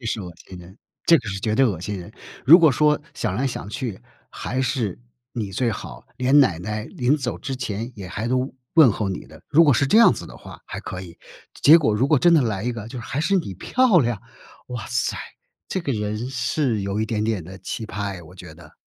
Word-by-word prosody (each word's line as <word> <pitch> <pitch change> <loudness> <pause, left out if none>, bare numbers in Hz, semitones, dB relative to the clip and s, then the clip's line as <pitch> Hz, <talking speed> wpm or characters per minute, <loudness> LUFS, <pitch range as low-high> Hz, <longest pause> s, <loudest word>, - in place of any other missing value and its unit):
这 115 - -7
是 110 - -2
恶 90 -2 -7
心 90 +1 -12
人， 90 +3 -14 0.3
这 165 -2 +6
个 110 - -7
是 95 - -3
绝 110 +1 0
对 135 - +4
恶 95 -8 -2
心 100 +2 -4
人。 100 +5 -10 0.3
如 160 +6 +9
果 160 -5 +5
说 150 +2 +3
想 90 - -2
来 130 +6 0
想 120 -5 -5
去， 105 -2 -5 0.3
还 130 - -3
是 120 -7 -1 0.3
你 105 -5 -4
最 115 +4 0
好 - - -8
连 130 +3 +5
奶 90 -12 +3
奶 105 +4 -4
临 125 +5 0
走 140 - -4
之 135 - -4
前 115 0 -4
也 95 -4 -8
还 105 +5 -4
都 130 +1 -1 0.2
问 155 -8 +7
候 105 -2 -2
你 95 - -5
的， - - -16
如 165 +3 +6
果 145 - +5
是 135 - +2
这 215 +11 +5
样 230 - +7
子 - - -7
的 - - -12
话， - - -12
还 - - -6
可 90 - -6
以。 85 -3 -11 0.4
结 160 +4 +7
果 110 -9 +1
如 125 +6 +1
果 150 -3 +4
真 175 +4 +5
的 155 - +5
来 105 -3 -2
一 125 - 0
个 110 -2 -7
就 125 +1 -7
是 115 - -7
还 140 - -3
是 195 +5 +2
你 125 - -2
漂 235 - +3
亮， 120 -6 0 0.5
哇 120 -3 -5
塞， 125 +2 -1 0.5
这 190 - -2
个 140 -6 -2
人 105 +3 -3
是 125 -2 0
有 100 +2 -2
一 110 - 0
点 105 -1 -1
点 110 -6 -1
的 95 +3 -10
奇 110 +4 -5
葩 100 -1 -4
诶， 90 - -9
我 85 +3 -15
觉 90 -4 -11
得。 80 -2 -16
115 Hz, 265 characters per minute, -23 LUFS, 100-135 Hz, 0.5 s, 如